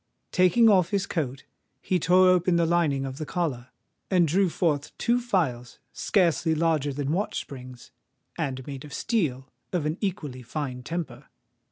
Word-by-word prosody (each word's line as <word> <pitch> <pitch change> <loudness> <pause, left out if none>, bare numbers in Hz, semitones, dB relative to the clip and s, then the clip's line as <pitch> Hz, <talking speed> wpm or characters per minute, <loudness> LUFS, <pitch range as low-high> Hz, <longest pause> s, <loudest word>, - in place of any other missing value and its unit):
Taking 185 +6 +5
off 185 -5 +4
his 200 -1 0
coat, 135 -8 -3 0.3
he 185 - 0
tore 180 +3 +5
open 180 -1 +3
the 170 0 +3
lining 160 -5 +1
of 135 0 -6
the 155 - -3
collar, 145 -9 -2 0.4
and 180 -3 +4
drew 185 +4 +2
forth 150 -4 -1
two 240 +1 +2
files 155 - -1 0.2
scarcely 170 -4 +2
larger 155 -3 +1
than 140 +1 -2
watch 195 +6 -1
springs, 125 -2 -10 0.4
and 135 -6 -3
made 140 -2 -7
of 150 - -8
steel 135 - -1 0.2
of 175 -5 -1
an 155 +3 -2
equally 155 - -3
fine 125 0 -5
temper. 145 -3 -5
160 Hz, 160 wpm, -26 LUFS, 135-180 Hz, 0.4 s, Taking